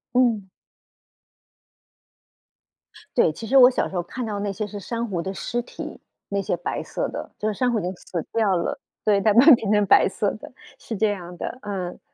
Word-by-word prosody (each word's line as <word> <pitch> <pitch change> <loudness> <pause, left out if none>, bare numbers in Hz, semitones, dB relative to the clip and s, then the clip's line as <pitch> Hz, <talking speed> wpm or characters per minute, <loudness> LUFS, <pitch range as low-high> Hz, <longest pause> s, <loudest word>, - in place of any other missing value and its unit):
嗯。 230 -6 +3 2.7
对， 200 -10 +4
其 225 +8 -8
实 270 +4 +3
我 250 -1 +9
小 250 - -1
时 190 - -9
候 175 - +1
看 245 +8 -6
到 210 -2 -3
那 200 0 -2
些 210 +2 -3
是 205 0 -7
珊 230 +4 -3
瑚 180 -4 -2
的 190 - -4
尸 235 +9 -3
体， - - -8 0.3
那 200 0 0
些 180 -2 -1
白 175 - -3
色 - - -3
的， - - -7
就 215 - -2
是 215 - 0
珊 245 +4 +1
瑚 225 - +1
已 190 - -5
经 180 - -2
死 170 -2 -5
掉 215 -4 +2
了。 285 +11 -2 0.3
对， 205 -2 +4
但 210 0 +3
慢 245 +4 +7
慢 310 - +11
变 220 -3 -4
成 210 -1 +4
白 - - +6
色 - - -1
的， - - -11 0.3
是 225 - -6
这 215 0 +2
样 175 -3 -7
的， 255 - -5
嗯。 190 -4 -5
205 Hz, 225 characters per minute, -24 LUFS, 190-235 Hz, 2.7 s, 慢